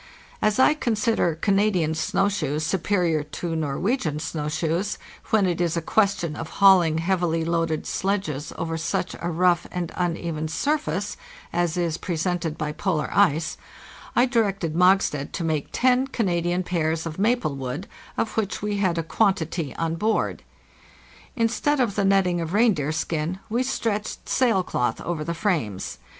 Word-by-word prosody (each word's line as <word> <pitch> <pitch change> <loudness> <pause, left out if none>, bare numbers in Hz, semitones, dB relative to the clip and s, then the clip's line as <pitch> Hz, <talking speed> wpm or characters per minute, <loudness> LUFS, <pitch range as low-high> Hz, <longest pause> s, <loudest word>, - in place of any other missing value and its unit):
As 215 -1 +2
I 260 +3 +6
consider 220 - +1
Canadian 195 -3 +2
snow 160 +5 +1
shoes 155 -6 -1
superior 170 -2 +1
to 165 +3 -4
Norwegian 160 - -1
snow 150 -1 -3
shoes, 165 +6 -1 0.3
when 215 -3 +4
it 175 -1 0
is 170 -1 0
a - - +3
question 195 -6 +1
of 160 +1 -6
hauling 185 -5 +6
heavily 165 -1 0
loaded 165 -2 0
sledges 185 -8 -2
over 165 0 -3
such 175 - -2
a 170 - -1
rough 175 +1 +2
and 175 -2 -3
uneven 165 -3 -2
surface 295 - -1 0.4
as 175 -1 0
is 170 -2 -1
presented 175 -1 -2
by 150 -1 -2
polar 165 -1 -1
ice, 160 -5 +2 0.6
I 245 - +5
directed 200 -10 0
Mogstad 180 -5 +3
to 175 - -3
make 155 -3 -1
ten 255 +1 +3
Canadian 175 -7 0
pairs 165 -2 -1
of 165 +1 -5
maple 220 - +1
wood, 135 +6 -4 0.3
of 225 - -1
which 215 -3 -1
we 210 0 -2
had 185 -4 +1
a 165 - 0
quantity 165 - 0
on 165 0 -2
board. 215 +5 0 0.9
Instead 245 +5 +1
of 235 -6 +2
the 200 0 +1
netting 190 -3 +3
of 165 +1 -4
reindeer 200 - +3
skin 160 +2 -2
we 235 +3 +1
stretched 225 -5 -2
sail 230 -8 +2
cloth 125 -8 -1
over 165 -3 -3
the 170 +2 -3
frames. 160 - -2
175 Hz, 155 wpm, -24 LUFS, 160-205 Hz, 0.9 s, I